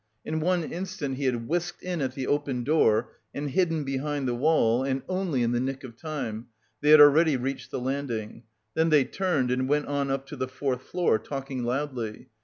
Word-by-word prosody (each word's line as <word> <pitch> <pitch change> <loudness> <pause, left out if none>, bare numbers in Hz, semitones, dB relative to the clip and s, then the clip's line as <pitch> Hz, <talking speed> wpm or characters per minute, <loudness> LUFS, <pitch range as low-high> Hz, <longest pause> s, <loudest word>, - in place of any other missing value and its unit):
In 160 0 -2
one 175 +1 +1
instant 170 -6 -4
he 140 - -2
had 120 -3 -1
whisked 175 +2 -2
in 180 -3 -2
at 130 -1 -2
the 135 - -3
open 140 -4 -1
door 120 -5 +3 0.2
and 145 0 -3
hidden 165 -1 +1
behind 135 0 -2
the 120 - 0
wall 125 -3 +3
and 135 0 -1
only 185 -9 0
in 115 - +1
the 120 - +1
nick 135 +2 -3
of 120 -3 -9
time; 120 -7 -5 0.3
they 150 - +2
had 155 0 +9
already 150 0 +7
reached 130 +2 -4
the - - -3
landing. 125 -4 -3 0.3
Then 160 +1 +2
they 150 -4 +5
turned 145 -5 0
and 130 +1 0
went 150 0 +2
on 140 -1 -1
up 135 0 -1
to - - -6
the 130 -1 -2
fourth 130 0 -2
floor, 170 -8 +1
talking 135 +2 -5
loudly. 125 -3 -3
135 Hz, 205 wpm, -27 LUFS, 125-155 Hz, 0.3 s, had